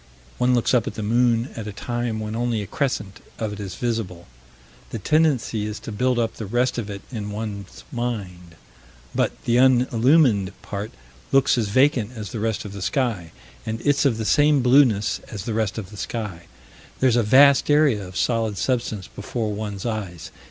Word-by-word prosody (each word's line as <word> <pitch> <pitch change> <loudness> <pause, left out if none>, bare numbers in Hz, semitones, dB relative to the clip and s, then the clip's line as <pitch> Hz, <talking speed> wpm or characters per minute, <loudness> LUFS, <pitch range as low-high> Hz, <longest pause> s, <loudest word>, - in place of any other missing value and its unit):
One 125 0 +3
looks 120 - +1
up 120 -3 +3
at 105 - -4
the 110 - -4
moon, 120 +2 +2
at 110 -2 -6
a - - -4
time 120 +2 -3
when 110 0 -4
only 115 -2 -1
a - - -6
crescent 105 -4 -3 0.2
of 110 -2 -3
it 105 - -8
is 100 -2 -6
visible. 110 -8 -3 0.6
The - - -4
tendency 125 -4 +1
is 105 0 -5
to - - -7
build 125 +4 +1
up 115 -1 -1
the 110 - -5
rest 120 +3 0
of 105 -3 -5
it 100 -1 -7
in 105 -4 -5
one's 105 -2 -6
mind; 95 -8 -5 0.6
but - - +1
the 120 0 +2
unillumined 125 - +4
part 100 +1 -5 0.4
looks 135 -1 +4
as 115 -4 0
vacant 130 -1 +2
as 105 -4 -6
the 115 - -4
rest 110 0 -2
of 100 - -7
the 100 - -7
sky, 110 - -1 0.3
and 110 0 -4
it's 145 -1 +3
of 130 -6 +2
the 110 - -3
same 145 +2 +4
blueness 125 -5 +4
as 105 -7 -6
the 115 - -2
rest 110 -2 -1
of 100 -3 -6
the 105 - -11
sky. 100 -7 -5 0.5
There's 130 -3 +3
a 120 - +4
vast 135 +6 +5
area 145 -8 +4
of 90 0 -8
solid 115 -3 0
substance 115 -4 -1
before 110 +1 -4
one's 105 -1 -5
eyes. 100 -8 -4
115 Hz, 190 wpm, -23 LUFS, 105-125 Hz, 0.6 s, vast